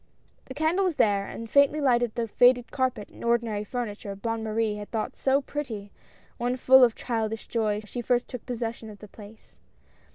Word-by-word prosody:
The 260 - -9
candle 320 +6 +1
was 360 -4 0
there, 200 -4 +2
and 230 - -7
faintly 280 +4 +4
lighted 240 -5 +2
the 235 -1 -1
faded 245 +2 +4
carpet 260 -6 -1
and - - -13
ordinary 230 -3 0
furniture, 210 -3 -5
Bonne 225 +3 -3
Marie 215 -1 -1
had 205 0 -8
thought 225 +3 -3
so 275 +1 +1
pretty, 225 -9 -5 0.5
when 245 +1 -1
full 260 +1 +7
of 235 -3 +4
childish 225 -2 -3
joy 215 -2 -1
she 240 +3 -5
first 245 +1 +1
took 250 -4 -8
possession 230 -2 -4
of 210 - -11
the 210 - -12
place. 210 +2 -15
235 Hz, 185 wpm, -26 LUFS, 215-255 Hz, 0.5 s, full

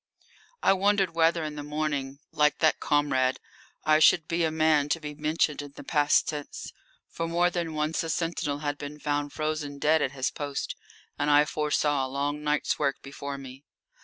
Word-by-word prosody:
I - - +6
wondered 195 -2 +2
whether 165 0 +3
in 155 -1 -4
the 150 - -6
morning, 145 -2 -3
like 150 0 +2
that 155 -2 +3
comrade, 130 -3 +1 0.5
I 155 0 +5
should 160 +1 +5
be 170 0 0
a 160 - +2
man 155 -2 +2
to 165 - +1
be 150 -2 -6
mentioned 150 0 0
in 145 -1 -10
the - - -9
past 145 -2 +3
tense. 150 -2 -6 0.4
For 165 - -3
more 175 +1 +2
than 170 -3 -3
once 155 +1 0
a 165 - -4
sentinel 160 -3 -2
had 145 0 -2
been 145 +1 -7
found 145 -1 -1
frozen 155 -2 -3
dead 155 +2 +3
at 130 - -1
his 130 -2 -1
post, 145 -2 -4 0.4
and 145 - +1
I 145 0 +6
foresaw 150 -2 0
a 130 - -3
long 145 +2 -2
night's 150 0 0
work 140 -3 +1
before 140 0 -6
me. 135 0 -10
150 Hz, 190 wpm, -27 LUFS, 145-160 Hz, 0.5 s, I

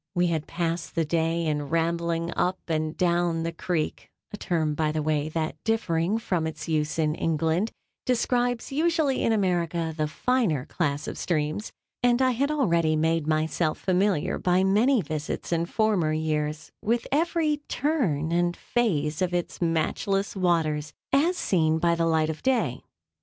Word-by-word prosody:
We 175 0 +3
had 155 -1 -2
passed 170 -1 -3
the 165 - +1
day 165 +1 0
in 150 -2 -1
rambling 170 0 0
up 185 +1 +1
and 155 -1 -1
down 175 -2 +1
the 165 - -2
creek, 155 -9 -3 0.2
(a - - -4
term, 160 -6 0
by 155 0 0
the 155 0 -2
way, 155 0 0
that, 160 0 -3
differing 205 -4 +1
from 180 -7 -1
its 160 - -6
use 155 -1 0
in 155 -2 +1
England, 165 +6 0 0.4
describes 245 0 0
usually 310 -2 +1
in - - +2
America 170 -5 0
the 155 -1 0
finer 180 - 0
class 150 -3 -2
of - - -5
streams;) 155 +4 -1 0.3
and 245 0 +3
I 260 -1 +4
had 270 +4 0
already 170 - +2
made 160 0 +1
myself 155 +1 0
familiar 185 -3 +1
by 180 +1 +2
many 215 +5 +3
visits 155 +2 -4
in 170 0 +1
former 205 -7 +1
years 155 -1 -2
with 230 +2 0
every 315 0 +1
turn 185 - 0
and 175 0 +1
phase 155 -10 0
of 180 -1 +1
its 175 +1 -3
matchless 175 +5 0
waters, 160 -5 0 0.2
as 330 +7 +3
seen 160 - +2
by 170 +1 +2
the 165 0 +1
light 160 -1 +2
of 155 - -9
day. 260 -2 +1
170 Hz, 160 wpm, -26 LUFS, 155-210 Hz, 0.4 s, I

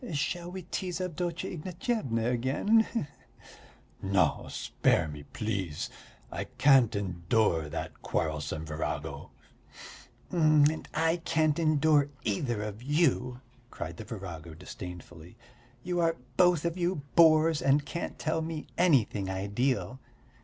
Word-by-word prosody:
Shall 170 +4 -2
we 185 0 -7
tease 180 0 -3
Avdotya 175 -1 -3
Ignatyevna 170 - -2
again, 135 - +2
he 235 - 0
he?" - - -3 1.0
"No, 95 -1 +1
spare 80 - +1
me, 75 -1 -7
please. 100 -8 -3 0.4
I - - -3
can't 135 -6 +4
endure 85 -3 +1
that 80 - -6
quarrelsome 80 0 -2
virago." 75 0 -4 1.0
"And 155 -2 +3
I 165 +1 +2
can't 160 -2 +1
endure 155 -2 +3
either 110 +1 -1
of 105 +1 -6
you," 130 -3 +1 0.3
cried 85 -6 -6
the - - -6
virago 90 -7 -7
disdainfully. 90 +2 -10 0.5
"You 175 0 -1
are 165 -1 +2 0.2
both 175 -3 +4
of 170 +2 -1
you 175 -4 0
bores 160 -1 +6
and 140 +1 +3
can't 170 - -5
tell 160 0 -1
me 160 -1 -4
anything 120 - +3
ideal. 120 +7 -1
140 Hz, 120 wpm, -29 LUFS, 100-165 Hz, 1.0 s, bores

